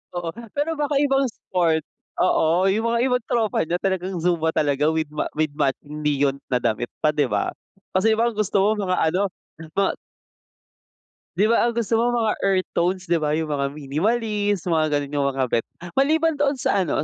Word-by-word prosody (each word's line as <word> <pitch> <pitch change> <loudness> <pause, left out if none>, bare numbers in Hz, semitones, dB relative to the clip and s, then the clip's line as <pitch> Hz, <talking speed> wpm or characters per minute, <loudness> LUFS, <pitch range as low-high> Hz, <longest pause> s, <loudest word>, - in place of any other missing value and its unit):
Oo, 175 -1 -3 0.3
pero 305 +2 -1
baka 290 -1 -1
ibang 275 -1 +2
sport, 170 -7 0 0.4
oo 180 +1 +3
yung 215 +4 0
mga 235 - +2
ibang 250 -2 +1
tropa 225 -8 0
niya 175 +2 -2
talagang 190 -2 -2
zumba 165 -2 +1
talaga 145 0 +1
with 160 -2 -1
ma 150 - -3
with 155 0 0
matching 150 +3 -2
neon 140 -2 +1
na 125 -1 +1
damit 115 +2 0
pa 155 - +5
'di 150 -1 +1
ba? 105 -4 0 0.4
Kasi 205 +4 +3
iba 230 - +1
ang 215 - -10
gusto 200 -2 +1
mo 210 +2 +2
mga 185 0 +1 0.2
ano 195 +4 +1 0.5
mga 195 -1 +2 1.4
'Di 215 +3 +3
ba, 235 - +3
ang 235 - -2
gusto 230 -1 +1
mo 240 +1 +2
mga 220 -2 +1
earth 190 -1 +1
tones 180 +2 0
'di 170 - +4
ba 150 -1 0
yung 155 -1 -2
mga 140 -1 0
minimalist, 205 - 0
mga 155 -1 +2
gano'n 145 -1 -2
yung 140 - +2
mga 135 - +1
bet, 115 - 0 0.2
maliban 315 - +2
doon 285 0 +2
sa 245 -6 +1
ano 160 -4 0
185 Hz, 190 wpm, -23 LUFS, 150-225 Hz, 1.4 s, pa